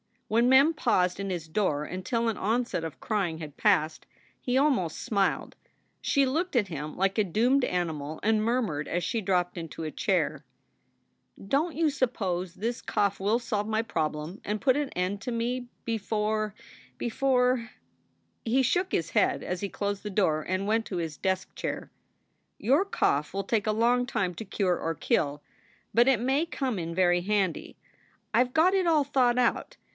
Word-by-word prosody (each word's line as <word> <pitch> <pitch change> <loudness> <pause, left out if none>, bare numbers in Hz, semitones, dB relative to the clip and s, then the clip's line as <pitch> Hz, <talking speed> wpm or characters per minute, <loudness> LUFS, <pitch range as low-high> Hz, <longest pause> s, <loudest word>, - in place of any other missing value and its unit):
When 230 +3 +3
Mem 275 +5 +6
paused 185 - +1
in 195 0 -3
his 175 -3 -4
door 155 -4 0
until 230 +8 -2
an 225 - -3
onset 225 -5 -1
of 160 - -8
crying 195 -7 -1
had 150 -3 -8
passed, 165 -7 +2 0.3
he 250 0 0
almost 265 - +2
smiled. 200 -5 0 0.4
She 280 -2 +3
looked 320 +6 -1
at 210 -6 +2
him 150 -2 -5
like 195 +2 0
a 215 - +4
doomed 240 +8 +2
animal 160 -4 -3
and 215 0 +2
murmured 215 -11 0
as 175 +1 -1
she 225 +7 -1
dropped 180 -2 0
into 165 -1 -6
a 155 - -3
chair: - - 0 0.9
"Don 285 - 0
t - - -11
you 325 -2 +4
suppose 190 - -1
this 235 +3 -3
cough 200 -1 0
will 210 +5 +2
solve 210 -3 -2
my 220 0 +1
problem 155 -3 -3
and 210 +1 -2
put 265 0 +3
an 290 -2 -1
end 185 +3 -2
to 245 - -4
me 245 +2 -2 0.2
before 215 -1 -1 0.4
before 250 -1 +1 0.4
" 85 0 -44
He 255 +4 +3
shook 360 +9 +1
his 165 0 0
head - - +2
as 180 0 -3
he 200 - -3
closed 200 0 -3
the 210 - -5
door 180 -6 +1
and 185 +1 -1
went 220 +2 +1
to 185 - -4
his 160 -3 -3
desk 190 0 -2
chair: - - -4 0.7
"Your 280 - +3
cough 150 - 0
will 195 0 -1
take 215 +1 0
a - - +3
long 240 +3 +2
time 190 -6 -1
to 220 - -6
cure 190 -2 0
or 165 0 -2
kill. 145 0 0 0.5
But 235 +2 +5
it 260 -5 +4
may 270 +6 +2
come 260 - -2
in 165 0 -4
very 175 -1 +3
handy. 195 -2 -1 0.6
I 235 +3 +5
ve - - -11
got 325 +7 +4
it 380 -2 +2
all 310 -3 +4
thought 255 -3 +2
out. 245 -2 +1
210 Hz, 180 wpm, -28 LUFS, 180-245 Hz, 0.9 s, Mem